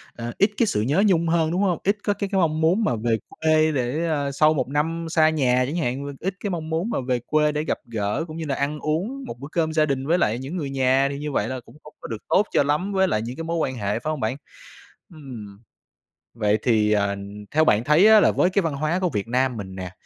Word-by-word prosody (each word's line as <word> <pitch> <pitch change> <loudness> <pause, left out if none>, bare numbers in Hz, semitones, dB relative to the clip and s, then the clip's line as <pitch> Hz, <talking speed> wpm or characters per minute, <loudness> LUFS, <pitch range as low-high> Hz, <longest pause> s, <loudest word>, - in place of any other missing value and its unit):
à, 120 0 -5
ít 200 +1 +3
cái 235 - +3
sự 105 - 0
nhớ 145 - +2
nhung 170 -3 +2
hơn, 165 -1 +1
đúng 180 +3 0
hông? 185 -4 +1
Ít 200 +2 +1
có 205 - +1
cái 200 0 -4
cái 195 -1 +1
mong 160 -2 +1
muốn 175 +8 +3
mà 125 - +1
về 115 0 0
quê 155 0 +2
để, 135 +4 -1
a, 145 -3 -1
sau 155 +3 +3
1 130 -4 -1
năm 165 +4 -1
xa 160 -1 +4
nhà 130 -5 +2
chẳng 145 - -4
hạn 140 -3 -2
và 140 - -5
ít 190 +1 -2
cái 205 - -3
mong 165 -4 -4
muốn 165 +7 -1
mà 235 - -1
về 125 -2 +1
quê 150 0 +2
để 150 0 -2
gặp - - -1
gỡ 110 +5 -2
cũng 155 0 -8
như 165 - -4
là 140 - -1
ăn 145 +2 -2
uống 190 - -2
một 120 - -8
bữa 140 - -7
cơm 160 -2 0
gia 155 -1 +3
đình 135 -2 -2
với 170 +3 +3
lại 120 -9 +1
những 140 +8 -5
người 145 -5 -3
nhà, 135 0 +2
thì 140 - -5
như 150 0 -4
vậy 105 -5 0
là 130 +1 -4
cũng - - -17
không 150 - -14
có - - -7
được 115 - -4
tốt 210 +3 +3
cho - - +3
lắm 150 +8 -1
với 190 0 +3
lại 110 - 0
những 120 +3 -5
cái 165 - -4
mối 165 +1 -2
quan 135 -5 -1
hệ, 105 -1 -2
phải 155 - -4
hông 155 - -4
bạn? 120 +3 -2 0.8
Ừm. 115 -10 -10 0.7
Vậy 105 -2 +1
thì, 110 -3 +2
ờ, 100 -1 +1 0.4
theo 155 +1 +3
bạn 105 -4 +3
thấy 150 - +5
á 220 0 +8
là - - +4
với 180 - +2
cái 200 +2 +1
văn 165 -4 -2
hóa 155 +5 -1
của 185 -1 0
Việt 105 -7 -3
Nam 125 0 0
mình 95 -3 -7
nè, 90 -1 -6
150 Hz, 275 wpm, -23 LUFS, 125-165 Hz, 0.8 s, á